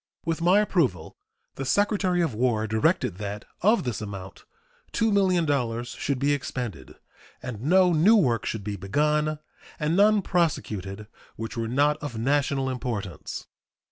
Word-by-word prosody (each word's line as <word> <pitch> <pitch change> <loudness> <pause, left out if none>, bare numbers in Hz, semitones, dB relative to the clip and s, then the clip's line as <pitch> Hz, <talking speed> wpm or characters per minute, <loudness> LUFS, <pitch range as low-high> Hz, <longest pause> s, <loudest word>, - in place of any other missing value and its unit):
With 165 0 -1
my 185 +5 +5
approval, 125 - 0 0.4
the 135 - -3
Secretary 190 - +1
of 160 -8 -1
War 110 -1 +1
directed 110 - +1
that 105 0 -5 0.2
of 215 +5 +3
this 120 -4 -3
amount 100 -2 -8 0.5
$2,000,000 155 - +1
should 140 -2 -1
be 140 +2 +2
expended, 120 - -5 0.4
and 125 -4 -7
no 180 +5 +4
new 175 +9 +5
works 125 - +2
should 110 -3 -4
be 105 0 -3
begun 150 +10 0 0.4
and 155 +2 0
none 205 +1 +4
prosecuted 105 - -1 0.3
which 115 +3 -6
were 115 -1 -2
not 145 +5 +2
of 145 -7 -6
national 135 +2 +1
importance. 115 -8 -4
135 Hz, 140 wpm, -26 LUFS, 110-170 Hz, 0.5 s, my